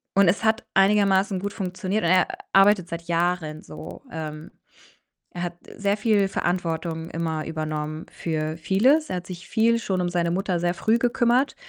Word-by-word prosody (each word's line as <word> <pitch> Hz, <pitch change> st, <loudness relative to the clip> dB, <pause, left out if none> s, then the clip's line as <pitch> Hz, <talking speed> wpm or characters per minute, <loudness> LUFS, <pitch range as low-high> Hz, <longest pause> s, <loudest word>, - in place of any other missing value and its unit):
und 200 Hz, -2 st, +5 dB
es 200 Hz, +5 st, +2 dB
hat 220 Hz, +1 st, +2 dB
einigermaßen 195 Hz, -1 st, +3 dB
gut 200 Hz, +1 st, -3 dB
funktioniert 190 Hz, +1 st, -2 dB
und 170 Hz, -, +2 dB
er 185 Hz, -1 st, +4 dB, 0.3 s
arbeitet 195 Hz, -2 st, +5 dB
seit 170 Hz, 0 st, -5 dB
Jahren 170 Hz, -2 st, -1 dB
so. -, -, -10 dB
Ähm, 155 Hz, -1 st, -6 dB, 0.8 s
er 175 Hz, 0 st, -4 dB
hat 175 Hz, 0 st, -4 dB, 0.2 s
sehr 200 Hz, 0 st, +1 dB
viel 205 Hz, -2 st, +2 dB
Verantwortung 165 Hz, -2 st, -2 dB
immer 160 Hz, -2 st, -3 dB
übernommen 155 Hz, 0 st, -4 dB
für 155 Hz, -1 st, -3 dB
vieles. 255 Hz, -, +3 dB
Er 180 Hz, -, -2 dB
hat 175 Hz, -, -7 dB
sich 175 Hz, -1 st, -9 dB
viel 230 Hz, 0 st, +3 dB
schon 190 Hz, -4 st, -1 dB
um 175 Hz, -, 0 dB
seine 170 Hz, -1 st, 0 dB
Mutter 185 Hz, -1 st, -1 dB
sehr 175 Hz, 0 st, +1 dB
früh 220 Hz, +5 st, +2 dB
gekümmert, 245 Hz, +2 st, +2 dB
180 Hz, 170 wpm, -24 LUFS, 165-205 Hz, 0.8 s, und